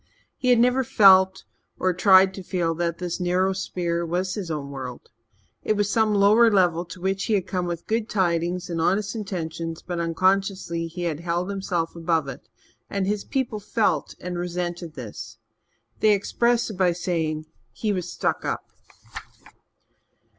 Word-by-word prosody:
He 255 Hz, -, -4 dB
had 245 Hz, -, +6 dB
never 250 Hz, +3 st, +3 dB
felt, 190 Hz, -6 st, +5 dB, 0.3 s
or 185 Hz, 0 st, +1 dB
tried 190 Hz, +1 st, +6 dB
to 190 Hz, -, -7 dB
feel, 175 Hz, -3 st, -1 dB
that 170 Hz, 0 st, -2 dB
this 175 Hz, -2 st, -4 dB
narrow 185 Hz, +2 st, +1 dB
sphere 175 Hz, -2 st, -2 dB
was 180 Hz, +2 st, -1 dB
his 200 Hz, -5 st, -5 dB
own 145 Hz, -3 st, -4 dB
world. 130 Hz, -3 st, -8 dB, 0.5 s
It -, -, +1 dB
was 205 Hz, 0 st, +1 dB
some 220 Hz, -2 st, +2 dB
lower 210 Hz, +4 st, +6 dB
level 180 Hz, -4 st, +2 dB
to 175 Hz, +1 st, -10 dB
which 190 Hz, +2 st, -1 dB
he 220 Hz, -, +1 dB
had 190 Hz, -3 st, 0 dB
come 180 Hz, -2 st, -2 dB
with 170 Hz, -1 st, -4 dB
good 225 Hz, 0 st, -1 dB
tidings 175 Hz, -2 st, 0 dB
and 165 Hz, -2 st, -2 dB
honest 195 Hz, +4 st, +1 dB
intentions 165 Hz, -5 st, -5 dB
but, 175 Hz, -2 st, -4 dB
unconsciously, 180 Hz, 0 st, 0 dB
he 175 Hz, +2 st, -6 dB
had 160 Hz, -3 st, -2 dB
held 175 Hz, +2 st, -2 dB
himself 180 Hz, -4 st, -2 dB
above 165 Hz, -3 st, 0 dB
it, 125 Hz, -, -10 dB, 0.4 s
and 200 Hz, -1 st, -1 dB
his 205 Hz, +1 st, -1 dB
people 255 Hz, -6 st, -2 dB
felt 200 Hz, -6 st, 0 dB
and 180 Hz, -1 st, -5 dB
resented 175 Hz, -2 st, -4 dB
this. 110 Hz, -2 st, -8 dB, 0.6 s
They 215 Hz, -1 st, +5 dB
expressed 235 Hz, +4 st, +1 dB
it 200 Hz, -, -9 dB
by 180 Hz, -2 st, +3 dB
saying 160 Hz, -3 st, -2 dB, 0.3 s
he 215 Hz, -2 st, -2 dB
was 180 Hz, -2 st, -3 dB
"stuck -, -, -1 dB
up." -, -, -4 dB
180 Hz, 165 wpm, -24 LUFS, 170-200 Hz, 0.6 s, had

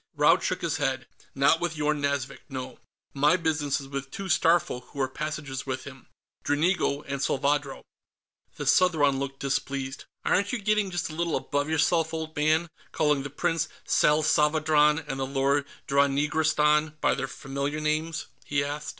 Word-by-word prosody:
Raud -, -, +4 dB
shook -, -, -2 dB
his -, -, 0 dB
head. -, -, -1 dB, 0.3 s
"Not 140 Hz, +4 st, +4 dB
with 170 Hz, -3 st, -2 dB
Yorn 150 Hz, -1 st, 0 dB
Nazvik, 140 Hz, -1 st, -2 dB
no. 130 Hz, -2 st, -6 dB, 0.3 s
My 145 Hz, +5 st, +3 dB
business 150 Hz, -4 st, 0 dB
is 135 Hz, -, -9 dB
with 140 Hz, 0 st, -4 dB
the -, -, -30 dB
two 195 Hz, +6 st, -6 dB
Starfolk 165 Hz, -7 st, +2 dB
who 140 Hz, -, -11 dB
are 135 Hz, -, +2 dB
passengers 145 Hz, -1 st, -5 dB
with 130 Hz, -1 st, -3 dB
him. 135 Hz, -2 st, -12 dB, 0.4 s
Dranigo 150 Hz, -1 st, +1 dB
and 140 Hz, 0 st, -3 dB
Salvadro." 140 Hz, 0 st, 0 dB, 0.7 s
The -, -, -5 dB
Southron 150 Hz, -7 st, +3 dB
looked 135 Hz, 0 st, -5 dB
displeased. 135 Hz, 0 st, -3 dB, 0.2 s
"Aren't 200 Hz, +4 st, +1 dB
you -, -, +1 dB
getting 210 Hz, -1 st, +1 dB
just 175 Hz, -3 st, -3 dB
a -, -, -8 dB
little 170 Hz, 0 st, -1 dB
above 145 Hz, +1 st, -1 dB
yourself, 160 Hz, +1 st, +1 dB
old 160 Hz, 0 st, -5 dB
man, 155 Hz, +2 st, +1 dB, 0.2 s
calling 150 Hz, -2 st, +1 dB
the 145 Hz, -, -5 dB
Prince 165 Hz, +2 st, -1 dB, 0.2 s
Salsavadran 150 Hz, 0 st, +3 dB
and 135 Hz, -2 st, -4 dB
the 135 Hz, -, -1 dB
Lord 140 Hz, +1 st, +1 dB, 0.2 s
Dranigrastan 150 Hz, +2 st, +2 dB
by 145 Hz, -, +2 dB
their 135 Hz, 0 st, -3 dB
familiar 140 Hz, +3 st, -4 dB
names?" 155 Hz, +1 st, -1 dB, 0.2 s
he 140 Hz, -1 st, 0 dB
asked. 145 Hz, +1 st, -4 dB
150 Hz, 165 wpm, -27 LUFS, 140-160 Hz, 0.7 s, Raud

